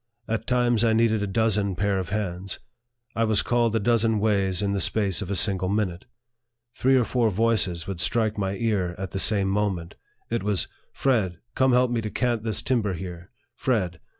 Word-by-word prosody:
At 115 0 -3
times 120 -2 +2
I 115 -1 +3
needed 110 -1 +2
a 105 - -1
dozen 105 -2 +1
pair 100 +1 0
of 90 -3 -5
hands. 95 -2 -3 0.6
I 115 - +1
was 110 -2 +2
called 120 -2 +1
a - - +3
dozen 115 0 +2
ways 100 -3 +1
in 100 0 0
the 100 - -1
space 100 0 +2
of 100 - -5
a 100 - -1
single 95 0 +2
minute. 100 -3 -1 0.7
Three 130 +2 +2
or 125 - +3
four 115 -1 +1
voices 100 -5 +1
would 95 -3 -5
strike 110 +3 +1
my 100 -1 -2
ear 100 -5 -1
at 95 -2 -5
the 95 - -3
same 100 0 +2
moment. 95 -4 -1 0.4
It 115 - 0
was 100 -2 -1
" - - -38
Fred., 105 -10 0 0.2
come 130 -1 +2
help 125 0 +3
me 120 -1 0
to 110 - -4
cant 120 0 -1
this 110 -1 -1
timber 115 -6 0
here." 85 +1 -8 0.3
"Fred. 95 -10 -1
105 Hz, 200 wpm, -25 LUFS, 95-115 Hz, 0.7 s, I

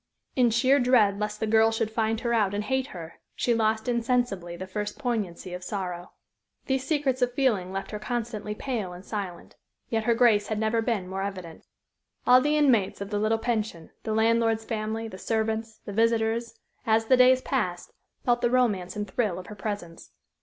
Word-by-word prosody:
In 250 -2 +4
sheer 255 +5 +4
dread 230 -6 +4
lest 210 0 -3
the - - 0
girl 220 +1 +4
should 225 -1 -1
find 225 0 0
her 235 -1 0
out 205 -3 +2
and 205 - -1
hate 265 +3 0
her, 170 - -9 0.2
she 240 - +1
lost 220 0 +1
insensibly 235 -8 0
the 185 - -5
first 210 +2 -4
poignancy 210 -9 -3
of 180 0 -6
sorrow. 180 -2 -5 0.5
These 265 -1 -1
secrets 280 -4 0
of 245 0 +1
feeling 215 -10 +1
left 195 0 -5
her 210 - -4
constantly 215 -2 -3
pale 215 -8 -3
and 180 +2 -11
silent. 195 -5 -6 0.3
Yet 225 -1 -1
her 235 - +3
grace 225 -4 +4
had 215 - -2
never 220 +1 +1
been 225 -6 -1
more 190 +1 -4
evident. 185 -4 -6 0.6
All 250 +1 +7
the 295 +2 +2
inmates 245 -10 +3
of 200 +1 -6
the 205 - 0
little 215 +1 +2
pension, 220 -8 -3
the 220 - -2
landlord's 225 0 +2
family, 220 0 -3
the 190 -4 -9
servants, 220 0 -2
the 205 - -6
visitors, 230 +1 +1 0.3
as 225 0 +2
the 255 - +5
days 255 0 +5
passed, 180 -9 -2 0.3
felt 240 -1 +2
the 240 - +2
romance 210 -8 +1
and 205 0 -3
thrill 200 -1 -1
of 185 - -7
her 210 - -9
presence. 195 -5 -6
220 Hz, 190 wpm, -27 LUFS, 200-240 Hz, 0.6 s, All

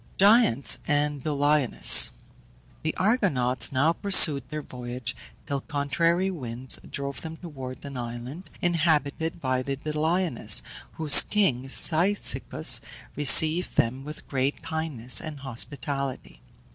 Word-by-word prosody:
GIANTS 200 - +3
AND 145 -2 -2
DOLIONES. 145 -3 +5 0.7
The - - -4
Argonauts 180 - +1
now 140 +5 +1
pursued 170 -7 +6
their 150 -1 -7
voyage, 125 -1 -8 0.3
till 140 -1 -4
contrary 165 +6 -2
winds 125 -6 -2
drove 140 0 -6
them 160 0 -9
towards 135 -7 -10
an 140 -1 -9
island, 120 +8 -8
inhabited 160 -1 -1
by 130 -3 -2
the 135 +1 -5
Doliones, 155 0 -1 0.3
whose 155 -3 +6
king 135 -11 -2
Cyzicus 180 +8 +1 0.3
received 155 +5 +3
them 130 +3 -1
with 150 +2 -11
great 135 +1 -3
kindness 155 -7 -1
and 150 -3 -8
hospitality. 135 +1 -5
145 Hz, 110 wpm, -24 LUFS, 130-160 Hz, 0.7 s, pursued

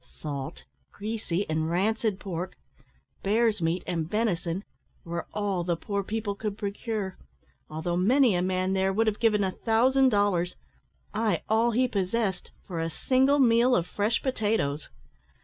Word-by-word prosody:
Salt, 135 - -6 0.3
greasy 205 -3 -3
and 155 0 -1
rancid 205 +3 0
pork, 185 -1 -5 0.6
bear's 215 0 +2
meat, 165 +2 0
and 165 -3 -2
venison, 190 -4 -1 0.4
were 170 0 -4
all 200 -4 -1
the 170 0 0
poor 200 +4 -2
people 215 0 -2
could 205 0 -4
procure, 205 -1 -3 0.5
although 160 +3 -2
many 235 +6 +4
a 175 - +1
man 185 +1 0
there 190 0 +2
would 220 +4 +2
have 215 -1 0
given 215 -3 +3
a 190 - 0
thousand 255 +6 +3
dollars 200 -5 +1 0.6
ay, 215 0 0
all 225 +2 +3
he 250 +3 +2
possessed 200 -2 -1 0.2
for 175 -4 -4
a 165 0 -1
single 265 - +2
meal 245 -1 +5
of 170 - +1
fresh 210 +5 0
potatoes. 210 - 0
200 Hz, 150 wpm, -27 LUFS, 180-225 Hz, 0.6 s, meal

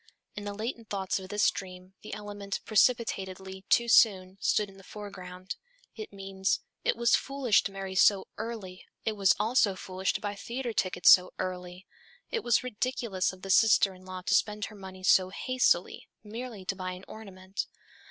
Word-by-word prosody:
In 205 - -6
the 205 - -4
latent 225 +1 -5
thoughts 195 -1 -1
of 190 0 -10
this 205 +1 +3
dream, 185 0 -9
the - - -9
element 205 -1 -5
"precipitately, 190 -4 0
too 235 - +4
soon," 195 -5 +4
stood 210 - +2
in 195 -1 -15
the 195 - -15
foreground. 185 -3 -8 0.4
It 215 -2 -7
means: 195 -1 -2 0.2
"It - - +2
was 235 +1 +4
foolish 275 -6 +2
to - - -2
marry 195 -1 -6
so 190 +1 +4
early, 215 -5 -6 0.2
it 220 - +2
was 195 -2 +4
also 215 -2 +3
foolish 185 0 -2
to - - -2
buy 205 -2 -3
theatre 235 +4 -4
tickets 185 -3 +4
so 180 0 +6
early, 180 0 -5 0.5
it 455 - -1
was 240 +1 +3
ridiculous 235 -5 -1
of 185 0 -15
the 195 - -2
sister 210 -1 +5
in 185 0 -16
law 185 0 -7
to - - 0
spend 210 -1 +1
her 215 - -11
money 190 -1 -10
so 185 0 +5
hastily, 245 -3 +1 0.2
merely 220 -2 -7
to 195 - -2
buy 185 -1 -4
an 180 +1 -10
ornament." 195 -3 -6
195 Hz, 180 wpm, -29 LUFS, 185-220 Hz, 0.5 s, so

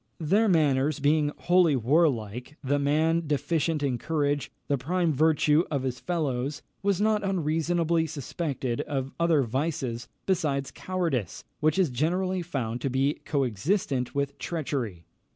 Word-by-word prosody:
Their 195 +8 +3
manners 150 -5 +2
being 145 +1 +2
wholly 175 -4 +4
warlike, 125 -1 +1
the 145 +2 +1
man 160 +3 +2
deficient 155 +1 0
in 130 -4 0
courage, 145 -2 -1 0.2
the 145 - +2
prime 165 +5 0
virtue 155 +1 +3
of 140 -4 -1
his 130 -1 -3
fellows, 145 -5 -2 0.2
was 200 -2 +1
not 215 0 +2
unreasonably 165 -2 +1
suspected 140 -4 -3
of 135 -1 -3
other 165 -4 +3
vices 130 -2 -2 0.2
besides 150 -8 0
cowardice, 165 - -2 0.2
which 155 +2 +2
is 180 -8 +3
generally 180 +8 0
found 125 -8 -3
to 135 - -1
be 135 +3 0
co 140 -3 +1
existent 130 - -1
with 140 0 -2
treachery. 130 - -3
150 Hz, 135 wpm, -27 LUFS, 135-170 Hz, 0.2 s, wholly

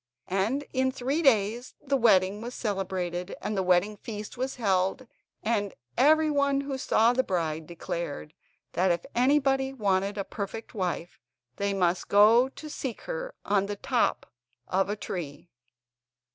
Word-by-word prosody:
And 215 +9 +1
in 260 0 +2
three 270 +5 -1
days 235 -3 +2
the 280 -1 -1
wedding 205 -4 +4
was 240 +2 -6
celebrated, 185 -4 -3
and 210 - -3
the 190 - +1
wedding 185 +3 +2
feast 210 0 -7
was 260 +2 -3
held, 195 +2 0 0.4
and 210 -3 0 0.2
everyone 285 -2 +3
who 280 -1 -4
saw 230 -1 +3
the 260 - +3
bride 160 -7 -2
declared 170 - -5 0.4
that 185 +2 +2
if 170 0 -1
anybody 270 +1 +2
wanted 200 -4 0
a 200 - -1
perfect 210 +3 -6
wife 180 -3 -3 0.4
they 200 0 0
must 180 -2 +1
go 225 +5 +6
to 305 - -10
seek 265 -5 -5
her - - -5
on 200 -1 +2
top 220 +5 0 0.4
of 195 +1 +1
a 205 - 0
tree. 170 -5 -6
210 Hz, 145 wpm, -28 LUFS, 190-260 Hz, 0.4 s, go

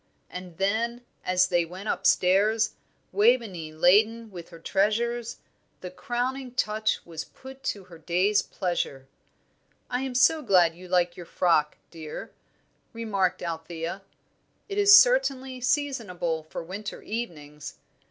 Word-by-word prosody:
And 180 -2 -8
then, 235 +5 -1 0.2
as 185 0 +2
they 175 -1 +2
went 185 +5 -9
upstairs, 210 +5 +3 0.4
Waveney 205 -6 +2
laden 215 +8 +3
with 175 -3 -9
her 165 - -12
treasures, 225 +6 0 0.4
the 180 - -7
crowning 250 +5 -3
touch 215 -2 0
was 165 -2 -6
put 265 +1 -13
to 200 - -2
her 170 -3 -14
day's 185 +5 +2
pleasure. 140 -7 -3 0.8
"I 250 +1 0
am 265 -2 -4
so 310 +5 +4
glad 180 - +4
you 180 +2 -13
like 175 -1 +1
your 175 -2 -10
frock, 155 -4 +2
dear," 160 -2 -8 0.6
remarked 200 -6 -1
Althea; 170 +2 -5 0.7
"it 405 0 -3
is 405 0 +10
certainly 265 - +1
seasonable 225 - -1
for - - -5
winter 195 +5 -7
evenings. 150 -10 -6
195 Hz, 125 wpm, -26 LUFS, 175-235 Hz, 0.8 s, is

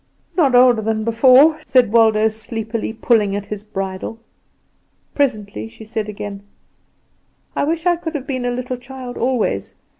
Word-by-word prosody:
"Not 280 -8 +3
older 245 -2 +6
than 220 0 -1
before," 260 +7 +5
said 250 -7 +3
Waldo 220 -1 +4
sleepily, 220 +1 -4
pulling 220 -3 +1
at 205 0 -4
his 210 0 -6
bridle. 195 0 -5 1.0
Presently 210 - -1
she 115 - -13
said 220 -1 -4
again: 200 -1 -6 1.1
"I - - +1
wish 325 +2 -2
I 350 -1 +3
could 330 -2 -6
have 275 -3 -4
been 255 -3 -3
a - - +1
little 250 +1 -3
child 250 0 -9
always. 230 - -1
230 Hz, 150 wpm, -19 LUFS, 215-255 Hz, 1.1 s, older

